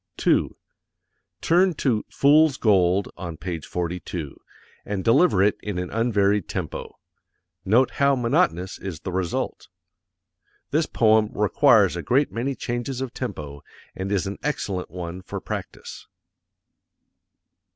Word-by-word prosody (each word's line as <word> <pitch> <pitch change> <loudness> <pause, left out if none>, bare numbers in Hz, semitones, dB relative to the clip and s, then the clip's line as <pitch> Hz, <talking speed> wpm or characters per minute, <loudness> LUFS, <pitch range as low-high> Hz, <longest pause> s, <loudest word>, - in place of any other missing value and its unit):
_ - - -49
2. - - +1 0.8
Turn 180 +1 +3
to 120 -7 0
"Fools 145 0 +4
Gold," 95 -3 +2
on 85 -3 -6
Page 85 -2 -5
42, 85 -3 -4 0.5
and 100 -2 -4
deliver 115 - +4
it 105 - +2
in 105 -3 -4
an 90 0 -4
unvaried 105 -4 +1
tempo: - - -5 0.7
note 120 +6 +3
how 140 0 +2
monotonous 95 -7 0
is 90 -6 -6
the 95 - -5
result. 90 -1 -3 1.0
This 155 +2 +1
poem 110 -1 +3
requires - - +4
a - - -3
great 140 +4 +1
many 130 +4 -2
changes 120 +2 -4
of 130 -2 -4
tempo, 75 - -6 0.3
and 95 +1 -4
is 100 -2 +1
an 100 +1 -5
excellent 100 -11 -3
one 90 +1 -6
for - - -6
practise. - - -7
100 Hz, 130 wpm, -24 LUFS, 90-125 Hz, 1.0 s, Fools